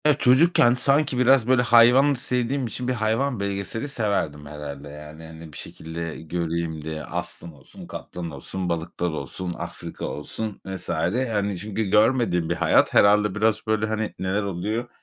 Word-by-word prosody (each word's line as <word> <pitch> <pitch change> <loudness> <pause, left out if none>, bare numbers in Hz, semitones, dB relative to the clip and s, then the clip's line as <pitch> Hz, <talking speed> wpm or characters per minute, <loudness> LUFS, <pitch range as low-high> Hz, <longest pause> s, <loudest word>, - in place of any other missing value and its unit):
Ya 150 - +6
çocukken, 130 -2 +5
sanki 140 +1 +2
biraz 125 -1 +4
böyle 130 -1 +4
hayvan 125 +4 +6
sevdiğim 125 0 -1
için, 125 +3 -5
bir 130 - +1
hayvan 115 +2 0
belgeseli 100 +5 -3
severdim 100 - -1
herhâlde, 75 -1 -8
yani. 75 +2 -11
Hani 80 -1 -11
bir - - -9
şekilde 80 0 -7
göreyim 85 -1 -3
diye. 80 0 -5
Aslan 85 +4 -6
olsun, 70 -3 -14
kaplan 85 -2 -7
olsun, 90 +6 -5
balıklar 85 +1 -2
olsun, 80 +4 -5
Afrika - - -7
olsun 105 +8 -5
vs. 95 -1 -6
hani 105 0 -1
çünkü 105 +3 -3
görmediğim 105 -5 +2
bir 85 - 0
hayat. 85 -2 +3
Herhâlde 105 -1 +4
biraz 110 0 +1
böyle, 110 0 +1
hani, 110 0 -2
neler 95 +3 -1
oluyor 105 +6 -3
100 Hz, 155 wpm, -24 LUFS, 80-120 Hz, -, Ya